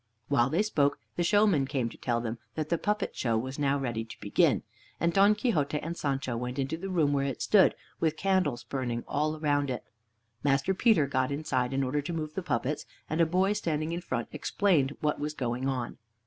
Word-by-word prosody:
While 135 -3 +3
they 170 +8 +2
spoke, 145 -9 +1 0.2
the - - -1
showman 190 -6 +3
came 130 -4 -1
to - - -12
tell 120 -2 -1
them 115 0 -4 0.2
that 155 -1 -3
the 170 - +1
puppet 210 -1 -1
show 115 -3 0
was 130 +5 -4
now 140 -1 +2
ready 120 -5 -2
to 115 - -11
begin, - - +2 0.4
and 170 +1 +1
Don 200 +2 +5
Quixote 160 - 0
and 165 +3 -5
Sancho 135 -5 -2
went 125 +2 -4
into 135 +3 -1
the 190 +4 -6
room 160 -6 +2
where 140 -1 +1
it 135 - -4
stood, 200 -3 +5 0.2
with 160 -1 +1
candles 185 -11 +1
burning 120 -2 -3
all 155 +2 -1
round 145 -2 +1
it. 125 -3 -3 0.6
Master 140 +5 +2
Peter 190 - +4
got 130 -1 0
inside 140 -4 -1
in 135 0 0
order 135 +3 0
to 170 +4 -5
move 155 -2 -3
the 190 - -2
puppets, 135 -3 -2 0.2
and 160 +2 +2
a 165 - +4
boy 185 +4 +2
standing 160 -6 -1
in 170 +1 -3
front 130 -8 -3
explained 155 -9 +1
what 150 -1 0
was 150 +1 -3
going 125 0 -2
on. 125 -3 -3
145 Hz, 210 wpm, -29 LUFS, 130-170 Hz, 0.6 s, Don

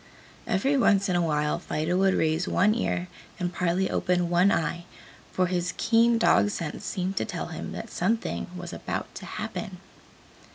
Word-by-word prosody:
Every 265 +10 +2
once 200 -6 +3
in 180 - +1
a 175 - +3
while 150 -2 0
Fido 155 +4 -2
would 190 0 +3
raise 160 +2 +1
one 205 +4 +3
ear 180 -6 -1 0.3
and 180 -1 -2
partly 180 +1 +1
open 180 -1 0
one 180 +3 +4
eye, 170 +2 -1 0.5
for 185 - +1
his 180 0 -1
keen 230 0 +4
dog 215 -2 +4
sense 165 -6 -5
seemed 190 0 -3
to - - +1
tell - - -5
him - - -6
that - - -7
something 225 0 -1
was 175 0 -7
about - - -4
to - - -8
happen. 195 -4 -5
180 Hz, 170 wpm, -27 LUFS, 170-200 Hz, 0.5 s, one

